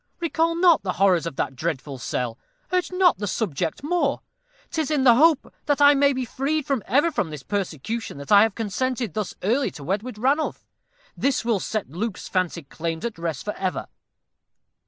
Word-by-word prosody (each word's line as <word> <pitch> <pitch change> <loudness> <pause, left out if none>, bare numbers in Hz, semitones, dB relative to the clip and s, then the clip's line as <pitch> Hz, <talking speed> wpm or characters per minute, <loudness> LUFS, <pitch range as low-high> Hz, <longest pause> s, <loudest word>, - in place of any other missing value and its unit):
Recall 330 0 +1
not 340 -2 +5
the 185 -2 -2
horrors 185 -4 +3
of 145 - -6
that 135 - -2
dreadful 140 -2 -3
cell 120 -2 -3 0.3
urge 365 0 +1
not 365 -1 +3
the 205 - -2
subject 180 - -2
more. 300 -3 0 0.5
'Tis 315 -3 -1
in 295 -4 +1
the 245 -3 +8
hope 300 +3 +3
that 290 -1 +2
I 285 0 +8
may 280 0 +4
be 260 -2 -2
freed 280 +5 -1
for 275 -5 0
ever 285 +10 +3
from 190 - -1
this 150 -3 -8
persecution 200 - -3
that 140 +6 -8
I 205 -1 +9
have 220 -2 +2
consented 235 0 -2
thus 210 -1 -3
early 245 +8 +2
to 145 - -11
wed 195 +7 -1
with 250 -2 -8
Ranulph. 275 +7 0 0.5
This 270 -3 0
will 230 -4 +2
set 210 -6 -3
Luke's 200 +4 -4
fancied 175 -5 -2
claims 165 +2 -4
at 230 -7 -4
rest 165 -4 -3
for 210 - -2
ever." 185 -1 -3
225 Hz, 190 wpm, -24 LUFS, 170-280 Hz, 0.5 s, I